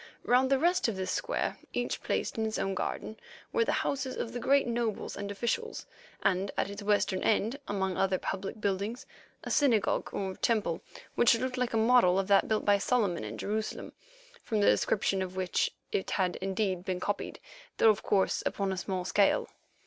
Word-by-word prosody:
Round 255 +2 +3
the 275 - +4
rest 350 +4 +2
of 225 - -1
this 190 -1 -2
square, - - -1 0.2
each - - -2
placed - - -1
in 220 -1 0
its 220 - -3
own 195 - -1
garden, 215 +3 -4 0.4
were 465 - +3
the - - 0
houses 265 -2 -2
of 230 - -4
the 245 - -3
great 275 +3 +3
nobles 235 -3 -2
and 200 0 -5
officials, 240 - -2 0.4
and 195 +1 +1
at 200 - 0
its 200 +1 -7
western 205 -2 +1
end, 225 +5 +1
among 190 -2 -1
other 190 -1 +2
public 195 +4 -4
buildings, 205 +4 -2 0.4
a - - -5
synagogue 245 -8 +2
or 190 -1 -3
temple 210 -8 0 0.3
which 235 -1 +5
looked 255 +2 -2
like 250 -2 -1
a - - +3
model 220 -5 +5
of 195 -1 0
that 200 -1 +5
built 220 -1 0
by 205 -1 +4
Solomon 205 -7 +1
in - - -6
Jerusalem, 215 +1 -3 0.5
from 220 - -1
the 205 - +3
description 195 -2 +2
of 185 0 -4
which 185 -1 0 0.2
it 190 - -1
had 185 -2 0
indeed 190 -1 -1
been 185 -1 -2
copied, 205 +2 -3 0.4
though, 225 - +7
of 205 - -3
course, 195 -2 +1
upon 195 -1 -1
a 190 - -3
small 185 -1 -3
scale. 200 +1 +2
205 Hz, 190 wpm, -30 LUFS, 190-235 Hz, 0.5 s, though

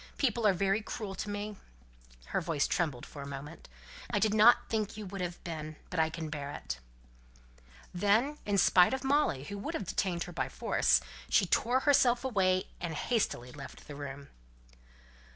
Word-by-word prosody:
People 235 -5 +2
are 200 - +5
very 195 +3 +1
cruel 210 -1 -5
to 205 - -5
me" 205 0 -4 0.7
her - - 0
voice 160 -4 0
trembled 150 -9 -1
for 145 - -9
a 140 - -6
moment 140 - -8 0.4
"I - - 0
did 215 -1 +2
not 220 +3 +6
think 215 -2 -2
you 215 - -6
would 195 0 -6
have 175 -1 -4
been. 155 -2 -5 0.2
But 180 - -1
I 160 0 +3
can 160 -1 -6
bear 145 -2 -4
it." 70 - -5 1.1
And 175 - -6
then, 230 +9 +3
in 205 -1 0
spite 185 +5 +5
of 265 - -6
Molly, 270 - +2
who 200 +6 -6
would 200 - -4
have 205 - -3
detained 175 -1 -1
her 175 - -8
by - - -2
force, - - +2 0.3
she 200 - +4
tore 245 +8 +2
herself 260 -3 +4
away, 185 -6 +2 0.2
and 170 -2 -4
hastily 150 - -1
left 140 +1 -10
the 150 - -7
room. 140 -1 -7
185 Hz, 185 wpm, -31 LUFS, 155-215 Hz, 1.1 s, not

